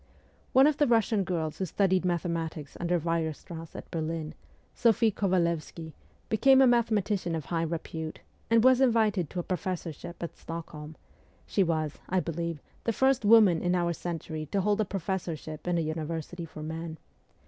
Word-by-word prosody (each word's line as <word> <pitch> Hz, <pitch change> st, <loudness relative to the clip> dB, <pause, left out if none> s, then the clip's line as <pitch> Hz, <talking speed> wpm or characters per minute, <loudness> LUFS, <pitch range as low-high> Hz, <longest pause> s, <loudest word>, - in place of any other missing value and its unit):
One 265 Hz, +1 st, +6 dB
of 300 Hz, -1 st, +3 dB
the 295 Hz, -, +3 dB
Russian 225 Hz, -3 st, +3 dB
girls 160 Hz, -4 st, -3 dB
who 190 Hz, -, 0 dB
studied 190 Hz, +1 st, +2 dB
mathematics 165 Hz, -3 st, -2 dB
under 175 Hz, 0 st, +1 dB
Weierstrass 165 Hz, 0 st, -3 dB
at -, -, -9 dB
Berlin, 160 Hz, -1 st, -3 dB, 0.4 s
Sophie 225 Hz, -1 st, +3 dB
Kovalevsky, 170 Hz, -4 st, -1 dB, 0.3 s
became 265 Hz, +4 st, +5 dB
a 265 Hz, -, +7 dB
mathematician 215 Hz, -7 st, +1 dB
of 160 Hz, -, -4 dB
high 165 Hz, -1 st, -1 dB
repute, 160 Hz, -1 st, -4 dB, 0.3 s
and 230 Hz, 0 st, +5 dB
was 260 Hz, 0 st, +6 dB
invited 220 Hz, -, +3 dB
to 180 Hz, -, -4 dB
a -, -, -2 dB
professorship 175 Hz, -2 st, -4 dB
at 170 Hz, -, -5 dB
Stockholm; 160 Hz, -2 st, -7 dB, 0.5 s
she 200 Hz, -, 0 dB
was, 160 Hz, -4 st, 0 dB
I 185 Hz, -, +2 dB
believe, 170 Hz, -1 st, -3 dB, 0.3 s
the 230 Hz, -, +1 dB
first 265 Hz, +1 st, +2 dB
woman 205 Hz, -6 st, +6 dB
in 180 Hz, 0 st, +1 dB
our 170 Hz, -1 st, +1 dB
century 160 Hz, -2 st, -5 dB
to 195 Hz, +6 st, 0 dB
hold 205 Hz, +2 st, +2 dB
a -, -, +1 dB
professorship 175 Hz, -5 st, -4 dB
in 175 Hz, -1 st, +1 dB
a -, -, +2 dB
university 160 Hz, +2 st, -4 dB
for 155 Hz, -1 st, -9 dB
men. 160 Hz, +1 st, -5 dB
175 Hz, 160 wpm, -29 LUFS, 160-205 Hz, 0.5 s, a